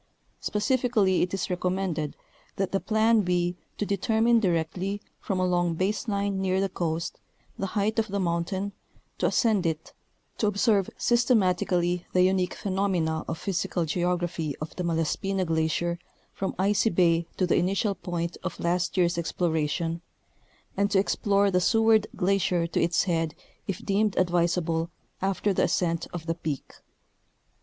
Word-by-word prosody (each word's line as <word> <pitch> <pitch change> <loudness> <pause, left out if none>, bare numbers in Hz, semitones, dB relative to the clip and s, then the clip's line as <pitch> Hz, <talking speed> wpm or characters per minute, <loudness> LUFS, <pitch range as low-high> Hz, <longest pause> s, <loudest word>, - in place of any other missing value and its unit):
Spe - - -5
cifically 215 -4 +2
it 180 - 0
is 195 -1 -2
recommended 180 -4 -1 0.4
that 195 -1 -1
the 195 - +1
plan 220 +1 +3
be 175 -1 0 0.2
to 210 - -1
determine 225 +3 +2
directly, 185 +1 -1 0.2
from 190 -2 -2
a 185 - +2
long 175 -2 +1
base 195 +7 -1
line 200 -2 -1
near 190 0 +1
the 195 0 +1
coast, 165 -1 -3 0.4
the 195 - -1
height 215 +2 +1
of 220 - 0
the 200 -1 -2
mountain, 185 +3 -1 0.5
to - - +2
ascend 220 -6 +2
it, 160 -2 -3 0.5
to 215 - +2
observe 205 -1 +2
systematically 180 -7 +2
the 180 - +5
unique 185 -1 +1
phenomena 185 -5 0
of 165 - -3
physical 180 -2 -1
geography 175 -2 -1
of 155 +1 -6
the 180 - -3
Malaspina 170 +3 0
glacier 165 +1 0 0.3
from 195 - -3
Icy 200 +4 +2
bay 170 -3 +2
to 185 - +2
the 175 - +2
initial 195 +3 +1
point 170 -2 -4
of - - -5
last 175 +2 0
year's 175 -1 +2
exploration, 165 0 -1 0.7
and 200 +1 +2
to 200 - +2
explore 200 0 +2
the 180 0 +2
Seward 225 +1 +4
glacier 180 -2 +1
to 170 - -1
its 170 0 +2
head 165 -4 -1 0.3
if 200 +4 -4
deemed 205 0 +2
advisalDle 170 -2 +1 0.3
after 195 +1 +1
the - - +2
ascent 170 -1 0
of 175 -2 -6
the 165 - 0
peak. 155 -5 -5
180 Hz, 150 wpm, -27 LUFS, 170-200 Hz, 0.7 s, the